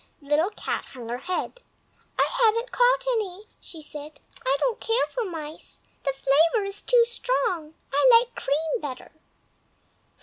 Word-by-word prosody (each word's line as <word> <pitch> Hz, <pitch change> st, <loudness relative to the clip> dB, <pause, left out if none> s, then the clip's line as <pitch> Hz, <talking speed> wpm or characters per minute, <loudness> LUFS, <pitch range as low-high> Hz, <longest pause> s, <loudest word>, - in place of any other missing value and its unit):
Little 295 Hz, +6 st, +2 dB
Cat 425 Hz, -, -4 dB
hung 240 Hz, -3 st, -8 dB
her 240 Hz, +1 st, -3 dB
head. 365 Hz, -, -3 dB, 0.6 s
"I -, -, +4 dB
haven't 460 Hz, +1 st, +3 dB
caught -, -, +3 dB
any," 410 Hz, -3 st, -3 dB
she 320 Hz, -3 st, -11 dB
said. 295 Hz, +1 st, -8 dB, 0.2 s
"I 270 Hz, +2 st, +2 dB
don't 485 Hz, -3 st, 0 dB
care 455 Hz, +2 st, +1 dB
for 485 Hz, -2 st, -2 dB
mice, 315 Hz, -4 st, -6 dB, 0.2 s
the 275 Hz, -, +1 dB
flavor 315 Hz, -, +3 dB
is 395 Hz, 0 st, -3 dB
too 485 Hz, -2 st, +5 dB
strong; 365 Hz, -10 st, -1 dB, 0.2 s
I 290 Hz, -, +5 dB
like 475 Hz, 0 st, +6 dB
cream 315 Hz, -, -1 dB
better." 260 Hz, -3 st, -7 dB
360 Hz, 145 wpm, -26 LUFS, 295-465 Hz, 0.6 s, like